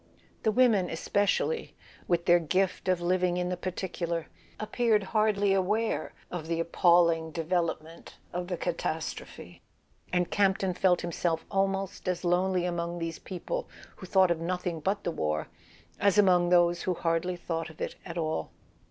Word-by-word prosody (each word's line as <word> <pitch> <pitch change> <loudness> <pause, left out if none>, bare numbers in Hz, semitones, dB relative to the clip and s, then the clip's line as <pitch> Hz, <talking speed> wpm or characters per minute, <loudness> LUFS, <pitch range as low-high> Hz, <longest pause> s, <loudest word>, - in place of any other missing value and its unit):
The 220 - +2
women 215 -6 +3
especially, 205 - 0 0.3
with 170 -1 +1
their 175 0 +6
gift 185 +4 0
of 185 -2 +2
living 180 0 +1
in 180 0 -1
the 180 - -1
particular, 175 -2 -3 0.3
appeared 215 -1 +1
hardly 210 -2 +3
aware 210 +4 0 0.2
of 170 -3 -5
the 165 0 -1
appalling 170 -1 +3
development 165 0 -3 0.2
of 175 0 -3
the 180 -1 -3
catastrophe; - - -4 0.5
and 180 -1 0
Campton 190 -2 +2
felt 180 0 +2
himself 170 -1 -1
almost 195 0 -1
as 180 0 -1
lonely 180 +1 +2
among 170 -1 -2
these 165 -1 -4
people 350 - -5 0.3
who 185 - -9
thought 190 -1 +4
of 170 - 0
nothing 175 0 -2
but 195 +6 -1
the 170 - -1
war 75 - -2 0.5
as 200 0 +3
among 180 -4 +5
those 175 -1 +4
who 185 - -1
hardly 170 +2 0
thought 165 -1 -4
of 160 - -15
it - - -3
at 170 -1 -7
all. 155 - -2
180 Hz, 150 wpm, -29 LUFS, 170-190 Hz, 0.5 s, their